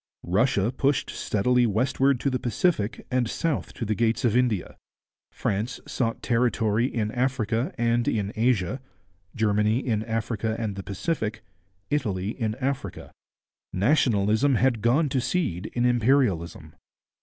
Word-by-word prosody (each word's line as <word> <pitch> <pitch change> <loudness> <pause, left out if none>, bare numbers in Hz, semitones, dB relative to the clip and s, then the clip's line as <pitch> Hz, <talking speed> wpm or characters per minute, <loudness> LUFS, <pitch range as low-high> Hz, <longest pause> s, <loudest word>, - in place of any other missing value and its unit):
Russia 105 +3 +2
pushed 135 +1 0
steadily 125 +4 +1
westward 130 +4 +1
to 140 - 0
the 130 - -1
Pacific 120 - 0
and 125 -2 +1
south 160 +2 -2
to 115 - -5
the 110 - 0
gates 115 +3 +1
of 115 -2 +2
India. 120 -7 +1 0.6
France 110 +5 -2
sought 115 -3 -2
territory 115 -1 +1
in 105 -2 -1
Africa 125 - 0
and 120 0 +1
in 105 -2 -1
Asia, 115 +1 +1 0.5
Germany 105 0 +2
in 115 -5 -1
Africa 110 -1 -2
and 110 -4 -3
the 95 - -5
Pacific, 110 - -3 0.5
Italy 105 -10 -1
in 110 -3 -2
Africa. 130 -6 -4 0.6
Nationalism 110 +2 +2
had 120 -2 +2
gone 135 +8 +3
to 130 -1 0
seed 125 - -1
in 120 0 +1
imperialism. 115 - +1
115 Hz, 130 wpm, -25 LUFS, 105-130 Hz, 0.6 s, gone